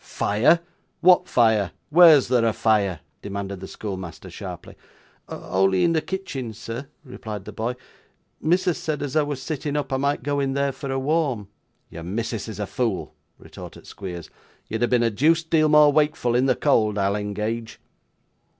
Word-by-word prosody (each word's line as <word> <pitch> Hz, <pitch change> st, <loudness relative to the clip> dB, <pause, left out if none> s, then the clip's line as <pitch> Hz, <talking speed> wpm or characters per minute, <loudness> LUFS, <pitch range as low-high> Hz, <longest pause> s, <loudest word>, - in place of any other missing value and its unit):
'Fire! 120 Hz, +12 st, +2 dB, 0.4 s
what 180 Hz, 0 st, +5 dB
fire? 110 Hz, -6 st, +2 dB, 0.2 s
Where's 160 Hz, -4 st, +7 dB
there 125 Hz, -1 st, +2 dB
a 115 Hz, -1 st, +2 dB
fire?' 100 Hz, -8 st, +1 dB, 0.2 s
demanded 100 Hz, -1 st, -5 dB
the 95 Hz, -, -8 dB
schoolmaster, 95 Hz, -5 st, -7 dB
sharply. -, -, -8 dB, 0.6 s
'Only 95 Hz, 0 st, +1 dB
in 165 Hz, -, +3 dB
the 160 Hz, -, +1 dB
kitchen, 135 Hz, -, -5 dB
sir,' 115 Hz, +4 st, -7 dB, 0.2 s
replied 110 Hz, -6 st, -7 dB
the 105 Hz, -, -7 dB
boy. 115 Hz, +4 st, -3 dB, 0.7 s
'Missus 175 Hz, +1 st, +1 dB
said 155 Hz, -2 st, -3 dB
as 140 Hz, -1 st, -4 dB
I 155 Hz, -, +5 dB
was 145 Hz, -3 st, -4 dB
sitting 150 Hz, -1 st, -3 dB
up, 145 Hz, -2 st, -3 dB
I -, -, +2 dB
might 140 Hz, -1 st, -1 dB
go 145 Hz, +1 st, -1 dB
in 135 Hz, -1 st, 0 dB
there 140 Hz, 0 st, 0 dB
for 135 Hz, +1 st, -7 dB
a 135 Hz, -, -1 dB
warm.' 135 Hz, -7 st, -1 dB, 0.4 s
'Your 85 Hz, -, -8 dB
missus 110 Hz, +5 st, -4 dB
is 110 Hz, -1 st, -7 dB
a 105 Hz, -, -1 dB
fool,' 115 Hz, -2 st, -2 dB, 0.2 s
retorted -, -, -12 dB
Squeers. 90 Hz, -4 st, -8 dB, 0.4 s
'You'd 110 Hz, -, -4 dB
have 120 Hz, -, +2 dB
been 120 Hz, -1 st, +3 dB
a 115 Hz, -, +2 dB
deuced 160 Hz, +8 st, +2 dB
deal 155 Hz, -2 st, +4 dB
more 150 Hz, -1 st, +6 dB
wakeful 150 Hz, -5 st, +1 dB
in 125 Hz, +2 st, +2 dB
the -, -, +3 dB
cold, 110 Hz, -8 st, +2 dB
I'll 100 Hz, 0 st, +1 dB
engage. 105 Hz, +2 st, -4 dB
120 Hz, 175 wpm, -23 LUFS, 105-145 Hz, 0.7 s, Where's